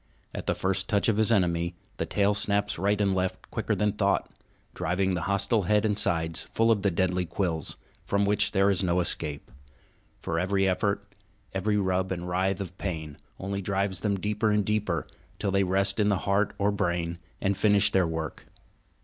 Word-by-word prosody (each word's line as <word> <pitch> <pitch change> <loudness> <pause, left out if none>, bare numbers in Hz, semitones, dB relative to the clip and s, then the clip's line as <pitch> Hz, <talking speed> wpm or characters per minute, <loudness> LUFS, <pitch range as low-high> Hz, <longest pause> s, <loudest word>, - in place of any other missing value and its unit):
At - - -6
the - - +1
first 95 +2 0
touch 105 0 +2
of 110 - +1
his 110 +1 +3
enemy 85 -4 +1 0.2
the - - -2
tail 100 0 +2
snaps 100 -1 0
right 100 +2 +1
and 100 -2 +2
left 95 0 -3
quicker - - -1
than 105 -1 +1
thought, 100 -1 0 0.4
driving 95 +2 0
the 85 - -1
hostile 100 +3 +2
head 105 +3 +2
and 105 -1 +1
sides 80 -4 0
full 115 0 +2
of 105 -3 +2
the 100 - +2
deadly 90 0 0
quills, 85 -2 -2 0.3
from 100 0 +1
which 105 0 +2
there 100 0 +3
is 95 0 +3
no 90 0 +2
escape; 75 -4 -2 0.7
for 85 - -2
every 95 +2 +1
effort, 100 +2 -1 0.4
every 105 +2 0
rub 95 -1 0
and 90 -1 -3
writhe 95 +2 0
of 95 -1 -7
pain, 80 -6 -4 0.2
only 100 +1 -3
drives 100 -1 -1
them 100 -2 -1
deeper 105 +2 0
and 105 -1 +2
deeper, 105 -7 -1 0.3
till 100 -2 -1
they 100 0 +3
rest 95 +3 +1
in 105 -1 +3
heart 100 +1 +1
or 100 +1 +2
brain 85 -3 -1 0.2
and 100 0 0
finish 100 +1 +4
their 95 -3 +3
work. 80 -1 -5
95 Hz, 185 wpm, -27 LUFS, 90-100 Hz, 0.7 s, finish